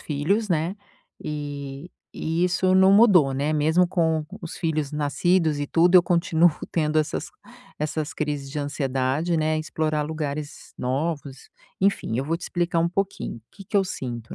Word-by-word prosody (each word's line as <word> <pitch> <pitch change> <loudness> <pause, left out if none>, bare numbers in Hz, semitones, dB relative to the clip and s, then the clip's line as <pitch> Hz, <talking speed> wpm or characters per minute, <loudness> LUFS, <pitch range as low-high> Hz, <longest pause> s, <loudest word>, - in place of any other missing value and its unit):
filhos, 180 +9 -1
né, 170 +3 0 0.5
e 145 +1 -6 0.2
e 165 +2 -2
isso 185 +1 +2
não 190 +1 +6
mudou, 190 - +6
né, 145 +3 0
mesmo 160 +4 +3
com 160 -3 0 0.2
os 170 - -7
filhos 155 -4 -1
nascidos 150 +1 +1
e 145 - -2
tudo, 175 +4 +3
eu 180 - +9
continuo 170 -1 +3 0.2
tendo 155 -1 +1
essas 155 - -2 0.5
essas 150 0 -3
crises 145 -2 -3
de 150 - -4
ansiedade, 140 +3 -1
né, 155 0 +1
em - - -1
explorar 155 -1 -1
lugares 150 -1 -5
novos, 140 +1 -3 0.3
enfim. 195 - +1
Eu 135 - -1
vou 165 +3 -1
te 170 - -15
explicar 175 -1 -1
um 170 - +2
pouquinho 190 -9 -3
que 195 - -13
que 200 - -2
eu 195 - +4
sinto, 120 -9 -6
155 Hz, 165 wpm, -24 LUFS, 145-175 Hz, 0.5 s, eu